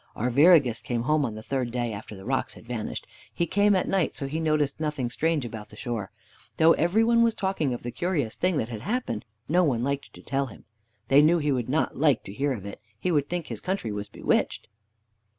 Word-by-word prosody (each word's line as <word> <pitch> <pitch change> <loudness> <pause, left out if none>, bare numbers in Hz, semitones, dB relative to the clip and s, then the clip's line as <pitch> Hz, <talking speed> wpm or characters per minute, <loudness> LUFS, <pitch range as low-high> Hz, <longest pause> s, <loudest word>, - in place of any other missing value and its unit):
Arviragus 130 0 +4
came 120 -4 -2
home 150 +3 +2
on 115 -5 -2
the 110 - -8
third 130 0 -1
day 120 -1 -2
after 105 +1 -8
the 95 - -11
rocks 130 +2 -1
had - - -14
vanished. 115 -3 -4 0.3
He 170 - 0
came 205 +4 +3
at 185 - +1
night, 190 -4 +1
so 140 - -4
he 150 +4 -3
noticed 155 -3 +1
nothing 150 -6 -2
strange 160 -1 0
about 110 -2 -7
the - - -13
shore. 110 -4 -4 0.5
Though 165 +1 +6
every 180 +7 +2
one 230 0 +4
was 230 -1 +3
talking 190 -8 -1
of 120 - -4
the 120 - -4
curious 155 -10 -1
thing 180 -2 +1
that 115 - -1
had 110 -3 -6
happened, 245 - -2 0.2
no 180 +4 +3
one 125 -7 +1
liked 140 +1 -2
to - - -14
tell 140 0 -1
him. 110 - -13 0.4
They 140 +2 +7
knew 160 +3 +5
he 150 -3 0
would 125 -3 -1
not 150 0 0
like 145 -5 +3
to 100 - -9
hear 140 +6 0
of 105 -7 -4
it. 100 - -8 0.2
He 180 - 0
would 145 -3 +1
think 175 -2 -2
his - - -7
country 185 - -2
was 105 0 -5
bewitched. - - -1
140 Hz, 230 wpm, -26 LUFS, 120-165 Hz, 0.5 s, They